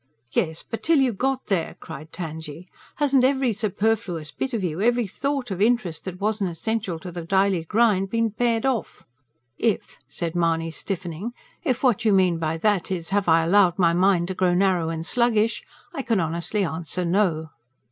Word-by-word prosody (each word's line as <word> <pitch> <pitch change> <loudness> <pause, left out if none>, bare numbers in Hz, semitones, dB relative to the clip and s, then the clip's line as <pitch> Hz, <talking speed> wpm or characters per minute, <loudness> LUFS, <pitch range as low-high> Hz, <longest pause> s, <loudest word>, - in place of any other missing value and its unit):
"Yes, 160 +1 -1
but 225 - -6
till 330 -1 +3
you 265 -3 +3
got 265 +5 -1
there!" 185 -5 -1
cried 155 +3 -9
Tangye. 160 0 -7 0.3
"Hasn't 275 -3 +3
every 265 -2 +2
superfluous 205 -6 -1
bit 265 - -3
of 225 -5 -2
you 170 0 -2
every 240 +1 +2
thought 270 +3 -3
of 190 0 -3
interest 210 -8 +1
that 185 -1 -6
wasn't 205 -2 0
essential 195 +1 -2
to 180 +2 -8
the 170 0 -6
daily 190 -1 +1
grind 205 -1 +2
been 230 +1 +1
pared 230 +2 0
off?" 260 -4 -2 0.5
"If," 225 -4 -1
said 170 -2 -4
Mahony 165 -1 +1
stiffening, 185 +5 -5 0.3
"if 260 -7 -1
what 245 -3 +3
you 215 -2 +4
mean 185 -3 +3
by 160 0 -1
that 200 0 +1
is, 180 -2 -3
have 200 -1 +1
I 165 0 +5
allowed 180 0 +4
my 170 -3 +4
mind 180 -1 +3
to - - -1
grow 180 -1 +2
narrow 180 -3 +2
and 165 0 -4
sluggish, 230 0 +1 0.3
I 285 - -3
can 230 -6 +1
honestly 170 +5 -1
answer 170 +2 -3
no." 170 -4 +1
190 Hz, 180 wpm, -24 LUFS, 170-230 Hz, 0.5 s, I